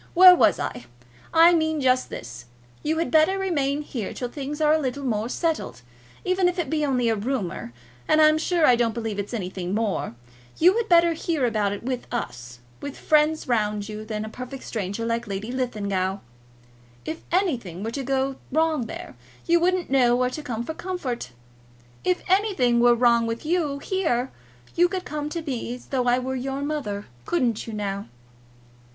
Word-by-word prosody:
Where 365 +1 +10
was - - +4
I? 125 -1 -4 0.5
I 335 +1 +7
mean 315 -2 +1
just 255 -1 +2
this. 120 0 -8 0.4
You 315 +1 -1
had 330 - -1
better 320 +5 +4
remain 300 -7 0
here 235 -8 -5
till 245 - -4
things 285 +3 -5
are 305 0 +4
a 315 - +3
little 280 0 -3
more 225 -3 -1
settled. 310 - -2 0.4
Even 370 0 +2
if 360 - -5
it 345 -3 -2
be 310 -1 +1
only 255 -4 +1
a 225 - +2
rumour, 200 - -3 0.4
and 310 - +4
I'm 310 0 +6
sure 335 0 +2
I 250 - +6
don't 235 -2 0
believe 225 -3 -3
it's 200 - -4
anything 185 -4 -3
more, 215 - -1 0.4
you 360 +5 +5
had 460 -2 -1
better 340 -1 +5
hear 320 -4 -1
about 215 -4 +1
it 205 - -5
with 250 0 -3
us, 125 - -5 0.2
with 285 -1 -6
friends 305 0 +2
round 210 -4 0
you, 215 0 -6
than 215 -1 -4
with 215 - -6
a - - -18
perfect 255 +1 -7
stranger 205 +1 -3
like 230 0 -1
Lady 200 +3 -4
Linlithgow. 200 -7 -1 0.9
If 320 +1 -5
anything 245 - 0
were 225 - -3
to 275 - -3
go 270 0 -1
wrong 310 -4 +1
there, - - -8 0.3
you 340 0 +4
wouldn't 360 -2 +1
know 245 -3 +4
where 250 0 +1
to 305 - -5
go 235 -5 -4
for 320 - -5
comfort. 315 - -4 0.7
If 180 - 0
anything 370 - +3
were 240 0 +6
wrong 235 -1 +3
with 230 +5 -4
you 310 -4 0
here, 280 -7 -1 0.4
you 350 +1 +4
could 370 -1 -4
come 300 -1 -4
to 335 +1 -4
me 245 -4 -3
as 250 - -13
though 255 -2 -1
I 245 0 +4
were 255 +1 -3
your 270 +2 -3
mother. 245 -9 -3 0.2
Couldn't 245 -11 0
you, 225 - -6
now?" 200 -1 -3
255 Hz, 190 wpm, -24 LUFS, 225-315 Hz, 0.9 s, Where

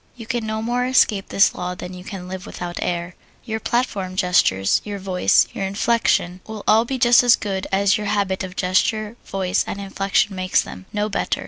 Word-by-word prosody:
You 230 -2 -10
can 230 -1 -3
no 220 0 -3
more 245 +2 0
escape 215 -6 +2
this 195 - +4
law 180 0 -4
than 180 +1 -8
you 180 0 -9
can 185 -2 -8
live 190 +2 -7
without 175 -1 -6
air: 175 0 -2 0.3
Your 220 -1 -3
platform 205 -6 -2
gestures, 180 - +2
your 205 -1 -5
voice, 190 -2 +3
your - - -4
inflection, 195 -3 +1
will 220 -2 -7
all 220 +2 +5
be 265 +2 -3
just 240 -1 +6
as 245 -1 +6
good 195 -2 -4
as 200 +1 +2
your 210 - -3
habit 200 -2 0
of 185 0 -7
gesture, 210 +4 0
voice, 190 0 0
and 200 - -4
inflection 195 0 0
makes 185 0 +1
them 95 - -10
no 210 0 -1
better. 205 -1 -1
200 Hz, 200 wpm, -21 LUFS, 185-220 Hz, 0.3 s, just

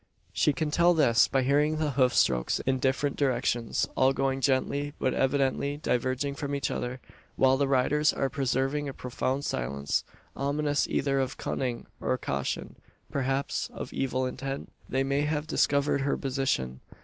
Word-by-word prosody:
She - - +3
can 150 +1 -2
tell 170 +2 +4
this, 125 -7 +5
by 135 -2 +1
hearing 150 +4 +2
the 155 -2 0
hoof 130 -2 +3
strokes 60 -2 +2
in 130 0 0
different 135 +2 0
directions: 120 -4 0
all 130 +1 +4
going 135 0 0
gently, 140 +2 0
but 130 - 0
evidently 140 +1 +1
diverging 130 0 -1
from 140 0 -3
each 140 -2 -1
other; 125 +1 -3 0.4
while 130 0 +4
the 140 +1 +1
riders 140 +3 +3
are 135 - 0
preserving 135 +2 -1
a 135 - -8
profound 130 +2 -2
silence, 70 +3 -1 0.3
ominous 145 +1 0
either 135 -1 0
of 130 -1 -2
cunning 125 -3 -3
or 130 - 0
caution 70 - -3 0.3
perhaps 135 0 -1
of - - -6
evil 130 -1 -1
intent? 135 +2 -5 0.2
They 135 0 +1
may 140 +1 +1
have 150 0 -1
discovered 140 -2 +2
her 140 +1 0
position? 130 - -1
135 Hz, 160 wpm, -28 LUFS, 130-145 Hz, 0.4 s, this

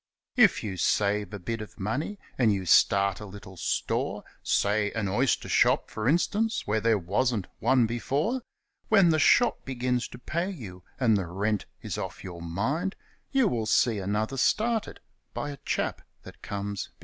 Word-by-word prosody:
If 220 - +5
you 95 -4 -4
save 105 +3 +1
a 100 - -5
bit 115 +4 -4
of 105 - -10
money, 130 - -2 0.2
and 120 -4 +3
you 95 -2 -1
start 100 +2 +4
a 105 - -7
little 95 -1 -11
store 85 - -1 0.2
Say, 105 0 +1
an 110 -3 -1
oyster 120 +8 +1
shop, - - +3
for 110 +3 -1
instance, 210 +8 +1
where 105 +1 0
there 115 0 +3
wasn't 105 +3 0
one 130 -3 +4
before 140 - -1 0.5
When 195 -5 +5
the 155 - +2
shop 240 +10 +4
begins 125 -1 -1
to - - -11
pay 170 +9 -2
you, 105 - -8 0.2
and 115 -5 +4
the 95 -3 -2
rent 100 +4 -1 0.2
is - - -4
ofi - - -6
your 85 -2 -8
mind, 130 - -2 0.4
You 265 -4 +3
will 115 - -1
see 115 -1 +3
another 105 +7 -1
started 220 - +1 0.3
by 145 - -3
a 140 - -8
chap - - -1 0.2
that - - -13
comes 100 -1 -4
behind. - - -32
110 Hz, 175 wpm, -27 LUFS, 100-140 Hz, 0.5 s, If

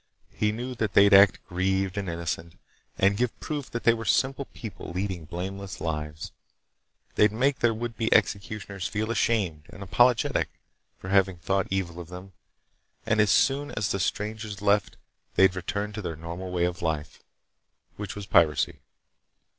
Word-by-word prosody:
He 105 - +1
knew 120 +4 -4
that 110 -5 -2
they'd 100 +2 +6
act 100 0 +6
grieved 95 +1 0
and 100 -2 -3
innocent, 85 -1 -4 0.4
and 100 +1 +3
give 125 0 -1
proof 145 -3 -4
that 120 - -4
they 115 - +6
were 115 -1 -5
simple 135 +5 +1
people 110 -4 -9
leading 90 -2 -3
blameless 95 +4 -6
lives. 75 -1 -4 0.8
They'd 105 0 +4
make 130 +5 +1
their 120 - +3
would 115 +1 -4
be 110 -1 -1
executioners 100 -1 0
feel 110 +1 -2
ashamed 95 -10 0
and 100 - -9
apologetic 120 +5 +3 0.5
for 95 - -9
having 95 -2 +3
thought 95 +3 0
evil 90 -3 -2
of 85 - -8
them, 90 +2 -10 0.7
and 110 -1 +3
as 105 - +3
soon 140 +7 +3
as 105 -1 -1
the 100 - -1
strangers 105 +2 -3
left 105 -1 +1 0.4
they'd 95 -1 +5
return 100 +3 -3
to 105 - -5
their 85 -4 -4
normal 85 +4 -6
way 90 -1 0
of 90 +1 -3
life, 80 -3 -3 0.8
which 100 -2 -5
was 105 -1 -6
piracy. 80 -6 +3
100 Hz, 160 wpm, -27 LUFS, 90-110 Hz, 0.8 s, they'd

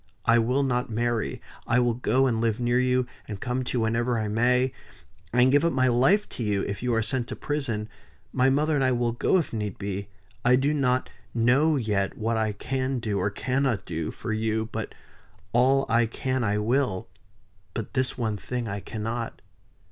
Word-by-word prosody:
I 115 0 +5
will 125 +5 +2
not 125 -1 0
marry 115 0 -1 0.3
I 120 +1 +3
will 120 -1 +2
go 125 +3 +2
and 115 -4 +1
live 115 -1 +1
near 120 +1 +2
you, 125 0 +2 0.2
and 105 -3 -6
come 125 +3 -2
to 125 - -2
you - - +1
whenever 115 +2 +1
I 110 -1 -1
may 125 +4 +2 0.6
and 125 +2 +4
give 145 +2 +4
up 170 - +2
my 130 -1 +3
life 135 - +3
to 120 - -5
you 105 -2 0
if 100 -1 -4
you 125 0 0
are 115 - +2
sent 120 +1 -1
to - - -5
prison; 130 -8 -2 0.5
my 130 +1 +4
mother 150 +3 +2
and 140 -2 +2
I 130 -1 +3
will 120 -1 +1
go, 120 +10 +2
if 170 - -2
need 105 -3 -3
be 100 0 -4 0.3
I 125 +1 +5
do 140 +4 +2
not 130 -3 +1 0.2
know 130 +7 +4
yet 105 -6 -1
what 115 +1 0
I 110 -1 +1
can 130 +5 -2
do, 105 -4 -1
or 100 - +1
cannot 125 -1 -1
do, 80 -2 -3
for 110 -1 -4
you, 110 0 -1
but 110 0 -5 0.6
all 135 +3 +4
I 115 -1 +3
can 130 +2 -2
I 105 -1 +1
will; 115 -2 0 0.7
but 115 - -4
this 130 -1 +2
one 110 -4 -1
thing 120 +3 -4
I 100 0 -3
cannot." 115 +3 -4
120 Hz, 200 wpm, -26 LUFS, 110-130 Hz, 0.7 s, I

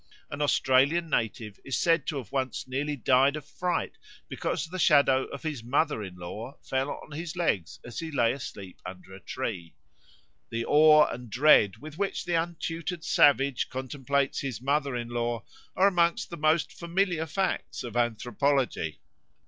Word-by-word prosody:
An 140 - -4
Australian 145 +4 +3
native 110 -2 -2
is 135 - -2
said 165 -5 +2
to 150 - -2
have 125 -7 -7
once 130 -3 -2
nearly 145 +3 -2
died 135 +2 +3
of 150 -2 -7
fright 175 +4 -3 0.3
because - - -2
the 185 +3 -7
shadow 135 -5 +4
of 140 - -9
his 150 -7 -4
mother 140 +1 +1
in 95 -3 -7
law 105 +9 -8
fell 135 +1 -1
on - - -8
his 160 +4 -5
legs 105 - -1
as 120 - -6
he 165 -1 -4
lay 120 -6 +2
asleep 100 -8 -9
under 90 +1 -10
a 95 - -10
tree. 100 -9 -5 0.7
The 115 0 -3
awe 155 0 +7
and 125 -1 -6
dread 120 -5 +5
with 155 +6 -11
which 200 0 -2
the 175 - -2
untutored 165 +1 -2
savage 140 -3 +3
contemplates 135 +1 -1
his 135 -4 -4
mother 140 +1 0
in 120 -1 -4
law 120 -2 -2 0.3
are 190 - +4
amongst 170 -2 +1
the - - -4
most 155 +1 +2
familiar 170 -1 -1
facts 190 +5 -2
of 120 -1 -7
anthropology. 120 - 0
140 Hz, 165 wpm, -28 LUFS, 120-160 Hz, 0.7 s, awe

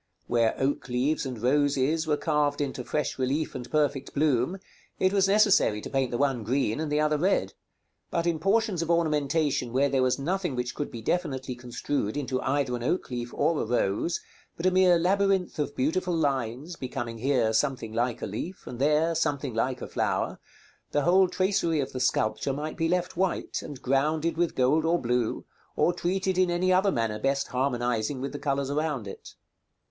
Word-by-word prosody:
Where 115 -2 +2
oak 135 0 -1
leaves 135 +4 0
and 125 -3 -6
roses 145 +4 +1
were 150 -1 +2
carved 150 -2 0
into 135 -3 -2
fresh 150 +1 -2
relief 140 +4 -1
and 125 -3 -7
perfect 145 -3 0
bloom, 145 +3 +1 0.4
it 185 +1 +2
was 195 -1 +3
necessary 200 - +4
to - - -8
paint 135 -2 +1
the 120 - -2
one 135 -4 +1
green 125 +1 0
and 155 -2 -2
the 150 - +2
other 150 0 +2
red; 190 +5 +1 0.6
but 170 0 -1
in 170 -2 0
portions 200 0 +1
of 165 - -3
ornamentation 150 -5 +1
where 135 +3 +2
there 135 -1 +1
was 130 -1 +2
nothing 175 +1 -2
which 125 -1 -2
could 145 - -4
be 115 -2 -8
definitely 130 -4 -1
construed 120 -1 -3
into 130 -2 -2
either 135 -2 0
an 120 - -5
oak 130 +4 -1
leaf 120 -1 -4
or 165 -2 +1
a - - 0
rose, 115 - 0 0.4
but 165 - -4
a 185 - +5
mere 185 -1 +5
labyrinth 190 0 +1
of 145 -1 -2
beautiful 170 +6 0
lines, 140 +1 -1
becoming 120 -3 -5
here 125 -3 +2
something 115 -2 0
like 120 +1 -1
a - - 0
leaf, 160 - -6
and 120 - -7
there 150 +4 +3
something 145 -5 -1
like 125 +3 -1
a - - -5
flower, - - -1 0.5
the 145 - +2
whole 185 +3 +5
tracery 185 -4 +1
of 135 -1 -3
the 130 - -3
sculpture 110 +1 0
might 150 +3 -4
be 165 0 0
left 180 0 0
white, 185 +1 -1
and 145 -4 -9
grounded 155 +5 +1
with 170 0 0
gold 135 +5 +3
or 165 +2 +2
blue, 120 -1 -1 0.3
or 175 - +3
treated 185 +1 -1
in 185 -1 +3
any 180 +2 +2
other 190 +2 +3
manner 115 -5 -1
best 135 0 0
harmonizing 125 -1 -1
with 135 +2 -4
the 145 - -6
colors 140 -1 -1
around 145 -7 -1
it. 100 - -10
145 Hz, 190 wpm, -27 LUFS, 125-165 Hz, 0.6 s, a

